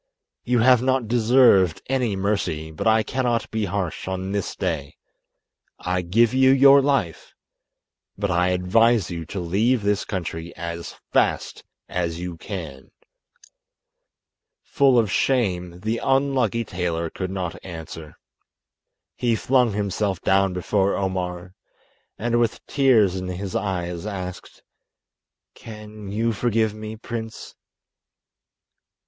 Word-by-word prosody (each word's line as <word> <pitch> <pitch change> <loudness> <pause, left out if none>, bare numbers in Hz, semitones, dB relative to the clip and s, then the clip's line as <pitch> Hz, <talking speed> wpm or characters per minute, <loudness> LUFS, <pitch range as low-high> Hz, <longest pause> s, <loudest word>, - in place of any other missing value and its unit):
You 125 0 +1
have 125 0 +5
not 130 -2 +1
deserved 115 -7 +4
any 125 -6 0
mercy, 90 -6 -2
but 80 - -3
I 110 0 +4
cannot 120 -2 -1
be 110 -1 -1
harsh 95 -3 -3
on 95 0 -3
this 100 -2 -3
day. 70 -3 -3 0.8
I 90 0 -1
give 110 +7 +2
you 130 0 +5
your 135 +1 +7
life, 135 - -1 0.8
but 100 -1 -1
I 90 0 +2
advise 95 +4 +2
you 85 -1 -5
to 100 - -5
leave 105 +7 +1
this 100 0 +1
country 85 -3 -5
as 85 0 -6 0.2
fast - - 0 0.2
as 85 -2 -2
you 90 -1 -5
can." 80 -7 -8 1.7
Full 135 -3 +3
of 110 -4 +2
shame, 90 -9 0
the 110 +3 -1
unlucky 135 -3 +1
tailor 85 -3 -3
could 95 -1 -4
not 95 -3 -5
answer. 80 -3 -9 1.0
He 120 -2 +1
flung 125 -1 +2
himself 100 -2 -1
down 95 0 +3
before 95 +2 0
Omar, 90 -1 -3 0.6
and 120 +2 0
with 115 -2 -1
tears 120 -9 +3
in 90 0 -4
his 95 +3 -5
eyes 90 -3 -3
asked: 90 -3 -7 0.9
"Can 105 -2 -10
you 115 +3 0
forgive 110 -1 0
me, 110 0 -7
prince?" 115 0 -7
100 Hz, 120 wpm, -23 LUFS, 90-115 Hz, 1.7 s, your